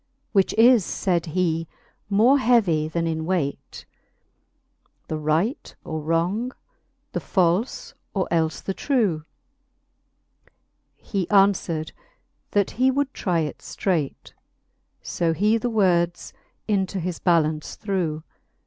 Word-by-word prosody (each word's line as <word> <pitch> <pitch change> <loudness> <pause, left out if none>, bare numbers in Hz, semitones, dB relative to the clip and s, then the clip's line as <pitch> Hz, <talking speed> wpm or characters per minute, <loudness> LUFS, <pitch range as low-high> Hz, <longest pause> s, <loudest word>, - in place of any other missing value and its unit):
Which 195 -3 +3
is, 230 -1 +6
fayd 175 -3 -1
he, 165 -1 0 0.4
more 230 +8 +5
heavy 200 -12 +3
then 165 +1 -2
in 160 -1 -2
weight, 160 -5 -3 1.2
The 155 - -2
right 160 - -1
or 160 -1 -4
wrong, 175 - 0 0.6
the - - -2
falfe 185 +5 0 0.2
or 190 -2 -1
elfe 160 -2 0
the 195 - -2
trew? 200 - 0 1.7
He 195 -4 -3
anfwered, 195 -6 +2 0.6
that 200 -2 +1
he 255 +2 +2
would 275 +1 0
try 175 -4 0
it 150 -2 -4
fteight, 165 -8 -3 0.7
So 165 -1 0
he 210 +7 +2
the 245 - -1
words 175 -5 +1 0.3
into 195 -2 0
his 180 0 -4
ballaunce 155 -3 +1
threw. 175 -7 -2
180 Hz, 115 wpm, -24 LUFS, 160-210 Hz, 1.7 s, is